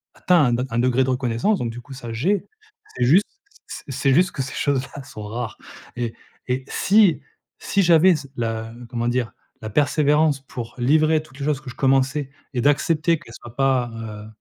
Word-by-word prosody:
atteint 170 -8 +3
un 125 - -1
un 115 - -1
degré 130 +1 +3
de - - -2
reconnaissance 125 - 0
donc 120 -2 -2
du 120 - -8
coup, 135 +2 -12
ça, 120 -3 -7
j'ai. 175 - 0 0.5
C'est 125 - +2
juste 175 +11 +5 0.4
c'est - - -8
c'est 135 +1 +1
juste 180 +3 +4
que 140 - -4
ces 130 - -7
choses 140 -3 +1 0.2
là 140 - -7
sont 110 -4 -9
rares 110 +2 -5 0.4
et 120 -2 -2 0.4
et 130 +1 -1
si, 200 -4 +4 0.4
si 200 - +1
j'avais 175 +1 +6
ce 140 - -9
la 115 -1 -3 0.2
comment 120 -1 -2
dire? 120 -1 -1 0.3
La 110 - -4
persévérance 150 +2 +2
pour 120 -3 -8
livrer 155 +5 +3
toutes 135 -3 -17
les 140 - -3
choses 150 -2 0
que 135 - -9
je 120 - -10
commençais 135 +1 +1 0.2
et 120 - +1
d'accepter 155 +3 +2
qu'elles 115 -8 -14
soient 120 0 -12
pas, 130 -3 +1
heu 110 -2 -7
135 Hz, 195 wpm, -22 LUFS, 120-150 Hz, 0.5 s, j'avais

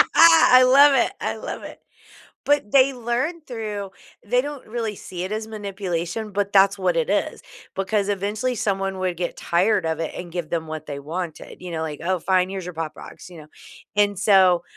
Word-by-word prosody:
I 325 -6 +7
love 275 +3 +7
it. 255 - +2
I - - -2
love - - -7
it. - - -10 0.7
But 290 -8 +1
they 275 0 +5
learn 250 +8 -2
through 215 -7 -6 0.3
They 245 +4 +2
don't 290 -1 -7
really 220 -2 -3
see 180 -2 -7
it 190 - -5
as 215 0 -3
manipulation, 200 -1 -4
but 200 0 -1
that's 195 0 +5
what 185 - 0
it - - 0
is. - - -1 0.3
Because 200 +1 -1
eventually 210 +5 -1
someone 195 -3 -2
would 185 -2 -2
get 175 0 -3
tired 180 +3 +1
of 160 0 -2
it 165 - -3
and 175 -1 -7
give 175 -3 -4
them 165 -1 -2
what 155 -1 -6
they 140 -2 -6
wanted, 165 +3 -7
you 180 -1 -7
know? 160 -1 -3
Like, 155 -2 -5
"Oh, 185 +1 0
fine. 185 +1 +1
Here's 190 -2 -5
your 180 - -7
Pop 160 -1 -4
Rocks." - - -12
You 170 -3 -11
know? - - -18 0.5
And 205 -1 +2
so, 190 -4 +4
195 Hz, 200 wpm, -22 LUFS, 175-225 Hz, 0.7 s, I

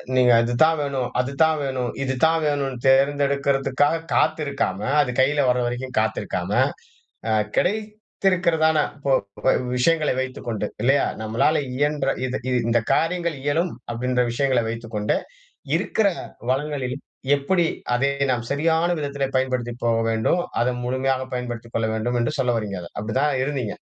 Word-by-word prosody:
நீங்க 125 -1 +5
இதுதான் 155 +8 +3
வேணும், 135 -3 -2
அதுதான் 155 +5 +2
வேணும், 130 -3 -2
இது 130 0 -1
தான் 160 0 +2
வேணும்ண்ட்டு, 140 -4 -1
தேர்ந்தெடுக்கிறதுக்காக 140 +2 +2
காத்திருக்காம, 145 -9 0 0.2
அது 125 -3 -1
கையில 140 +2 +3
வர 125 - +2
வரைக்கும் 125 +2 -4
காத்திருக்காம, - - -2 0.8
அ - - +1 0.3
கிடைத்திருக்கிறதான 185 -6 +1 0.2
இப்போ 140 -1 0 0.3
போ 130 - +6 0.3
விஷயங்களை 155 +3 +2
வைத்துக்கொண்டு 120 -5 -4 0.2
இல்லையா? 135 +3 +4 0.2
நம்மளால 120 +8 +1
இயன்ற 145 0 +1 0.2
இது 130 0 -2
இது 125 - +2
இந்த 120 0 +4
காரியங்கள் 170 -1 0
இயலும் 165 +4 +1 0.2
அப்டின்ற 125 +1 0
விஷயங்களை 130 -1 +1
வைத்துக்கொண்டு, 115 -2 -2 0.6
இருக்கிற 220 - +1 0.4
வளங்களில் 135 -1 -2 0.4
எப்படி 170 +5 +1 0.3
அதை 135 +3 +2 0.2
நாம் 120 -2 -2
சரியான 160 +4 +2
விதத்திலே 140 -1 -2
பயன்படுத்தி 125 -2 -1
போக 115 -1 +3
வேண்டும்? 110 +11 +1 0.2
அத 120 - +2 0.2
முழுமையாக 130 +1 0
பயன்படுத்திக் 120 -2 -5
கொள்ள 110 -1 +1
வேண்டும் 120 +3 -1
என்று 135 +6 -1
சொல்ல 125 -2 +2
வறீங்க 105 -3 -3
அத. 85 - -9
அப்டி 105 +1 -4
தான் 150 0 +2
இருந்தீங்க? 130 -7 -2
135 Hz, 135 wpm, -23 LUFS, 125-150 Hz, 0.8 s, போ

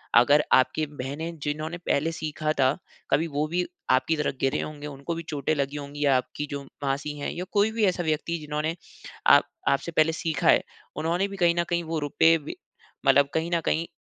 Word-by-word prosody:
अगर 145 +5 +6
आपकी 140 +4 +3
बहनें 150 +4 -5
जिन्होंने 155 +3 -3
पहले 165 -2 0
सीखा 155 -1 -2
था, 130 +1 +3 0.3
कभी 155 +4 +3
वो 150 0 -1
भी 175 +3 0 0.3
आपकी 130 +5 +3
तरह 150 - 0
गिरे 135 - +1
होंगे, 150 -1 -6
उनको 140 +3 -5
भी 165 - -5
चोटें 145 0 -1
लगी 140 0 -2
होंगी, 145 0 -5
या 140 -2 +5
आपकी 135 +3 -4
जो 140 0 -3 0.2
मासी 140 +2 -2
हैं 145 - -3
या 180 - -5
कोई 205 +1 +3
भी 220 0 -1
ऐसा 180 -2 +1
व्यक्ति 160 +1 -1
जिन्होंने 150 +1 -2 0.5
आप - - +8 0.3
आपसे 140 +5 0
पहले 160 0 +3
सीखा 160 -1 -1
है, - - +6 0.3
उन्होंने 175 +5 0
भी 195 -1 -8
कहीं 170 -2 +3
न - - +3
कहीं 170 -1 0
वो 160 -1 -2
रुपए 165 +3 +4
भी 150 -1 -8 0.5
मतलब 140 +1 +5
कहीं 160 +2 -1
न - - +2
कहीं 165 +1 0
155 Hz, 200 wpm, -26 LUFS, 145-165 Hz, 0.5 s, आप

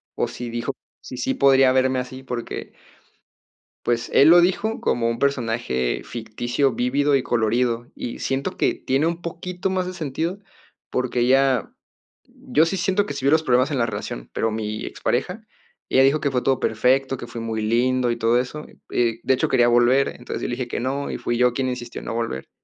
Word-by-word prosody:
o - - 0
si 120 -1 -6
dijo, 120 +3 -3 0.3
si, 125 - -9
sí 130 +2 -1
podría 135 -1 +5
verme 130 0 +2
así, 130 +1 -7
porque 125 -2 -5 1.1
pues, 120 -1 0
él 145 - +7
lo 175 +1 +8
dijo 200 +5 0
como 115 -1 +1
un 115 - -3
personaje 115 - 0
ficticio, 120 +3 -2
vívido 140 +4 +1
y 135 - +1
colorido, 120 +1 0
y 120 - -6
siento 135 +1 -2
que - - +2
tiene 135 +5 0
un 170 +1 -3
poquito 180 +2 -4
más 185 -1 -1
de 185 - -5
sentido 165 +4 -3 0.5
porque 125 -1 0
ya 135 -3 +2 0.5
yo 160 +2 0
sí 180 - -1
siento 190 +3 +1
que - - -5
si 140 -1 -5
vi 140 - +4
los 160 - +4
problemas 130 +3 +2
en 140 - -1
la 120 - +3
relación, - - -6
pero 115 - 0
mi 110 0 -4
expareja, - - -2 0.5
ella 130 - +5
dijo 140 +3 +4
que 140 - +1
fue 125 - 0
todo 135 -1 +1
perfecto, 130 +4 +1
que 120 - -7
fui 115 0 -7
muy 110 -1 -3
lindo 120 +2 +1
y 120 - -2
todo 115 +1 +3
eso. 150 +5 -5 0.3
Eh, 115 -2 +1
de 130 - +3
hecho, 130 - +1
quería 120 -2 +4
volver. 120 +3 +4
Entonces, 120 - -7
yo - - -1
le 120 - -2
dije 125 -1 -4
que - - -3
no 135 +3 -2
y - - -3
fui 120 - -2
yo 125 0 +3
quien 130 +1 -1
insistió 120 -1 -5
en - - -11
no - - -4
volver. 115 - -3
125 Hz, 205 wpm, -23 LUFS, 120-140 Hz, 1.1 s, lo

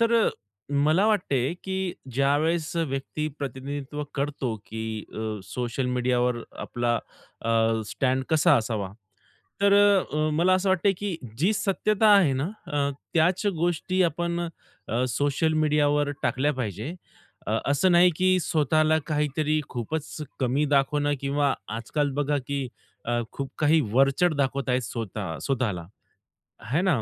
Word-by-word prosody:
तर 230 0 +3
अ, - - +2 0.4
मला 155 +8 +3
वाटते, 145 - +1
की 190 -1 -2 0.2
ज्यावेळेस 150 +5 +1
व्यक्ती 150 -1 -2
प्रतिनिधित्व 140 +1 -5
करतो, 140 -4 -2
की 110 -1 -5
अ, 110 -1 -3
सोशल 120 +5 -3
मीडियावर 125 0 +1 0.3
आपला 120 -1 0 0.5
अ, 115 - -2 0.4
स्टॅड 130 +4 0
कसा 160 -3 +5
असावा. 110 -4 -2 0.7
तर 200 0 +5 0.4
अ, 155 +1 +1
मला 175 +4 +3
असं 185 +1 +1
वाटते, 190 +2 +3
की 200 -4 -3 0.2
जी 180 +9 +3
सत्यता 210 +2 +2
आहे 175 -9 +4
ना 145 +8 -1 0.2
अ, 145 -1 +1 0.3
त्याच 180 +5 +2
गोष्टी 175 +2 +1
आपण 170 +1 -1 0.5
अ, 120 +3 +1
सोशल 145 +5 +1
मीडियावर 150 -1 +2
टाकल्या 145 +4 +1
पाहिजे. 115 - -4 0.5
अ, 110 +2 +1
असं 145 +7 +3
नाही, 175 +1 +6
की 185 +1 +3
स्वतःला 155 0 +2
काहीतरी 150 0 0
खूपच 145 +6 -4 0.2
कमी 130 +3 +1
दाखवणं 145 +1 +2
किंवा 140 0 +1 0.2
आजकाल 145 +6 -1
बघा, 145 0 +1
की 140 -2 -1 0.4
अ, 120 0 0
खूप 135 -1 -5
काही 155 +1 +4
वरचढ 135 +6 +3
दाखवत 140 -1 -1
आहेत 125 - +2
स्वतः 105 -6 -4
स्वतःला 115 -11 -1 0.9
है 160 - +2
ना, 170 -11 +2
145 Hz, 135 wpm, -26 LUFS, 130-165 Hz, 0.9 s, नाही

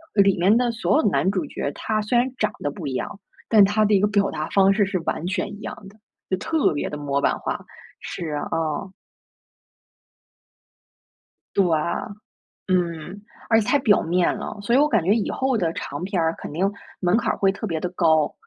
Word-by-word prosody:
呃， 200 - +6
里 195 -1 +3
面 190 +5 +4
的 240 0 +2
所 230 +5 +1
有 - - +4
的 210 - +2
男 190 - +1
主 185 -4 -1
角， 140 - -3
他 215 -1 -2
虽 215 +3 -1
然 245 +2 +3
长 215 -2 0
得 145 - -2
不 155 +3 -8
一 135 - -3
样， 180 - -4 0.3
但 210 -3 +7
他 210 +2 +2
的 210 -1 +3
一 - - +4
个 205 - +3
表 200 -1 +2
达 155 - -4
方 195 0 +4
式 205 +1 +3
是 190 -1 -2
完 165 0 -3
全 185 +1 -2
一 205 - -13
样 - - -6
的。 210 - -20 0.3
就 185 - +1
特 300 - +1
别 145 - -2
地 150 - -4
模 140 -1 -1
板 - - +1
化。 - - -3 0.4
是， 160 -3 -5 0.2
嗯。 165 +3 -2 2.6
对， 195 - +4 1.0
嗯。 175 +1 -1 0.3
而 225 - +5
且 210 - -2
太 285 - +4
表 220 -6 +4
面 175 +2 +1
了。 - - -6
所 235 +4 +1
以 - - +6
我 295 - +5
感 220 - +2
觉 190 +5 +3
以 220 -2 0
后 265 -2 0
的 170 -6 0
长 145 +1 -5
片 185 -2 -1
儿 160 0 +1
肯 - - -8
定 190 +5 +1 0.3
门 180 +1 +2
槛 - - +1
儿 - - -4
会 195 -1 +3
特 215 +3 -5
别 165 -4 -2
地 180 - -3
高， 160 -4 +2
195 Hz, 230 characters per minute, -23 LUFS, 170-215 Hz, 2.6 s, 但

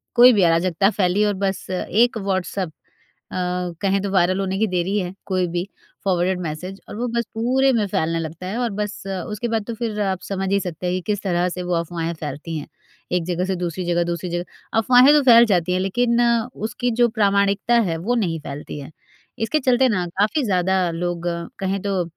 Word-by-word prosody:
कोई 245 +1 +9
भी 200 -4 +3
अराजकता 175 +3 +3
फैली 195 -1 +1
और 205 - +1
बस 195 -1 -3
एक 225 +6 +1
व्हाट्सएप 190 -2 -2
अ, 155 - -18 0.5
कहें 195 -1 +1
तो 200 - -2
वायरल 185 0 +2
होने 195 0 -1
की 220 - +2
देरी 185 +2 0
है 180 -1 -4
कोई 185 -2 0
भी 175 +1 -2 0.4
फ़ॉरवर्डेड 185 -1 +1
मैसेज 180 +4 -5
और - - -7
वो 240 +3 -2
बस 235 0 +1
पूरे 260 +4 +2
में 220 -3 +2
फैलने 165 -4 0
लगता 165 +2 -6
है 200 +5 -3
और 245 -1 0
बस 210 +1 -4
उसके 195 +4 -3
बाद 225 -1 0
तो 235 - -3
फ़िर 220 -2 -3
आप 190 -2 -1
समझ 195 -1 -3
ही 200 - +3
सकते 180 -2 -5
हैं 180 - 0
कि 185 - -2
किस 205 -1 -2
तरह 180 -2 +1
से 180 0 -5
वो 180 0 -2
अफ़वाहें 170 0 -2
फैलती 150 +2 -5
हैं। 150 - -6 0.4
एक 180 -1 +1
जगह 180 +1 -1
से 190 0 -1
दूसरी 175 0 -3
जगह, 175 0 +1
दूसरी 170 +1 -3
जगह 175 +1 -2 0.3
अफ़वाहें 250 +4 +6
तो 300 - +5
फैल 235 -2 +8
जाती 180 -5 +1
हैं 185 - +1
लेकिन 235 +5 +1 0.3
उसकी 240 +3 -2
जो 240 - +6
प्रामाणिकता 200 0 +2
है 165 - -1
वो 245 +2 +1
नहीं 175 -8 0
फैलती 145 +1 -7
है। 140 +2 -9 0.5
इसके 225 +8 +1
चलते 255 -1 +3
ना 185 -6 0
काफ़ी 215 +9 +2
ज़्यादा 190 -3 +1
लोग 175 0 -3 0.3
कहें 195 0 -1
तो 195 -2 0
190 Hz, 205 wpm, -22 LUFS, 175-215 Hz, 0.5 s, कोई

